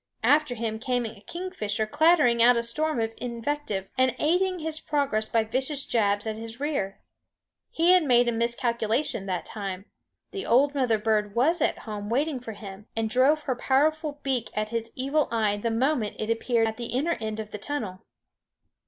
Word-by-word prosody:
After 285 +1 +3
him 220 -1 -3
came 245 0 -1
a 220 -2 -8
kingfisher 220 - -3
clattering 295 -2 +4
out 240 +1 +6
a 235 - 0
storm 305 +4 0
of 225 0 -1
invective 235 -4 -3
and 255 -1 +3
aiding 365 +4 +1
his 315 -1 -2
progress 280 -9 -1
by 225 -1 +2
vicious 265 +5 -1
jabs 205 -2 +1
at 220 -1 -3
his 225 +2 -8
rear. 275 -10 -2 0.7
He 335 +2 +3
had 365 0 +6
made 245 -2 +4
a - - +3
miscalculation 235 -1 -1
that 180 -2 -2
time; 195 -2 -5 0.5
the 395 0 -5
old 275 +4 +3
mother 255 -6 +2
bird 210 -1 0
was 310 +8 +2
at - - +1
home 210 -2 -5
waiting 275 +3 0
for 230 -2 -7
him, 205 0 -10
and 225 -1 -1
drove 280 +6 +3
her 260 -4 -1
powerful 295 +4 +1
beak 260 -4 -1
at 215 0 -1
his 230 0 -3
evil 275 +3 +1
eye 215 -3 +1
the 230 +3 -1
moment 235 -1 0
it 215 +1 -2
appeared 230 0 +1
at 220 0 -4
the 240 -1 -5
inner 300 +8 0
end 220 0 -3
of 215 -1 -6
the 210 - -6
tunnel. 210 -7 -4
235 Hz, 185 wpm, -26 LUFS, 220-290 Hz, 0.7 s, out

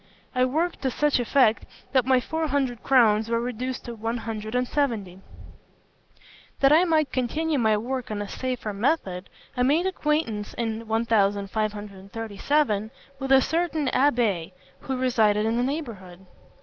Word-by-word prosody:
I 255 0 +3
worked 320 +7 -1
to 265 - 0
such 295 +2 +1
effect 240 -2 +2 0.2
that 260 -2 +2
my 260 -1 +5
four 320 +5 -2
hundred 265 -5 -1
crowns 225 -4 +4
were 230 0 +1
reduced 250 +2 -4
to 240 - -6
one 225 +1 -3
hundred 220 0 -5
and 250 0 +1
seventy. 220 -12 -1 1.4
"That 275 0 +5
I 325 +4 +6
might 310 -4 +2
continue 300 +4 -1
my 220 -2 +3
work 255 +3 -4
on 210 -1 -3
a 205 - -4
safer 250 -2 -4
method, 200 - -1 0.3
I 250 - -1
made 295 +8 +3
acquaintance, 300 - -1
in 225 -1 -3
1537, 210 +2 -1 0.3
with 270 0 -3
a 265 0 +7
certain 320 -2 -1
abbé 230 - +1 0.3
who 265 -1 -4
resided 220 -5 +2
in 225 +1 0
the - - +2
neighbourhood. 220 - -5
240 Hz, 150 wpm, -25 LUFS, 215-275 Hz, 1.4 s, a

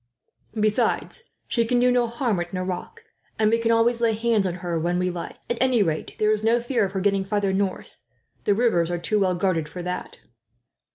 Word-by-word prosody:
Besides, 215 - 0 0.2
she 235 - +1
can 245 +2 +1
do 250 +1 +4
no 245 -1 +2
harm 235 -4 -1
at 175 +2 -5
Nerac; 185 - -4 0.4
and 215 -1 +3
we 230 - +3
can 230 0 0
always 230 +1 +2
lay 230 -1 +3
hands 220 -3 +1
on 175 - -3
her, 170 -2 -1
when 175 +2 0
we 180 0 0
like. 175 -1 -6
At 240 - -2
any 255 -4 +4
rate, 160 -4 -3
there 215 0 +2
is 215 0 +1
no 230 +2 +3
fear 240 -1 0
of 190 - -6
her 190 - -1
getting 195 0 +2
farther 200 -1 0
north. 195 -1 -2 0.5
The 205 - +3
rivers 200 -8 +2
are 175 - -1
too 190 +5 0
well 185 -2 +2
guarded 170 -4 0
for 180 - -7
that." 180 0 -5
205 Hz, 215 wpm, -24 LUFS, 180-230 Hz, 0.5 s, do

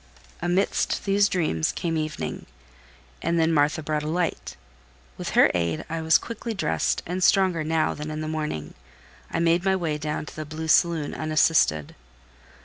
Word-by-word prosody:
Amidst 175 +3 0
these 200 0 +3
dreams 155 - 0
came 165 -2 -2
evening, 155 - -4 0.7
and 170 0 0
then 165 0 +3
Martha 150 +1 +2
brought 150 0 -1
a 150 - -5
light; 170 +1 -2 0.6
with - - -5
her - - +7
aid 85 -2 -1
I 165 0 -2
was 160 0 +5
quickly 230 0 -6
dressed, 80 - 0
and 180 +2 -2
stronger 185 -4 +3
now 160 0 +1
than 150 +1 -6
in 155 0 -4
the 155 - -4
morning, 150 - -4 0.6
I - - -3
made 170 +1 +2
my 190 0 +2
way 160 -5 -2
down 150 0 -3
to - - -11
the 155 - -4
blue 155 +1 -6
saloon 165 -3 +3
unassisted. 155 - +2
160 Hz, 165 wpm, -25 LUFS, 150-170 Hz, 0.7 s, her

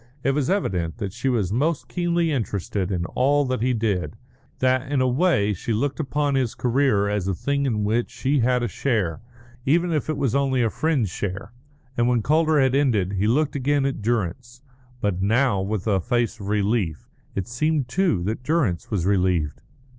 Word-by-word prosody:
It 135 - +2
was 145 +1 0
evident 95 - -1
that 100 -5 -4
she 135 - -1
was 105 -7 0
most 140 +1 0
keenly 170 +4 0
interested 100 - -2
in 85 -2 -1
all 145 +8 +2
that 130 -3 -2
he 125 +2 +2
did; 110 -4 -1 0.4
that, 130 +1 +1
in 145 - +2
a 130 - +3
way, 125 - +2
she 105 +5 -3
looked 135 +7 -1
upon 145 0 0
his 130 -4 0
career 125 -5 +2
as 100 -2 -1
a 95 - 0
thing 140 +6 -1
in 105 -4 0
which 115 +3 0
she 140 +2 0
had 125 +1 +2
a - - +1
share, 105 - -1 0.4
even 170 +6 +2
if 155 0 -1
it 155 - -1
was 135 -5 0
only 135 -2 +2
a 115 - +1
friend's 145 - 0
share. 100 +4 -5 0.4
And 120 -1 +2
when 120 -3 +2
Calder 155 +2 +3
had 130 -1 +3
ended 115 -9 +2
he 100 +2 0
looked 145 +6 +1
again 140 +1 +1
at 135 -4 -2
Durrance, 120 +3 -2 0.4
but 95 -3 -1
now 110 0 +2
with 100 0 -3
a 100 -4 +2
face 120 +3 -1
of 100 - -7
relief. 100 -6 0 0.3
It 95 -2 -2
seemed, 145 +3 0
too, 145 - +1
that 110 +6 -2
Durrance 130 - 0
was 95 -6 -1
relieved. 90 -6 +1
120 Hz, 190 wpm, -23 LUFS, 100-140 Hz, 0.4 s, a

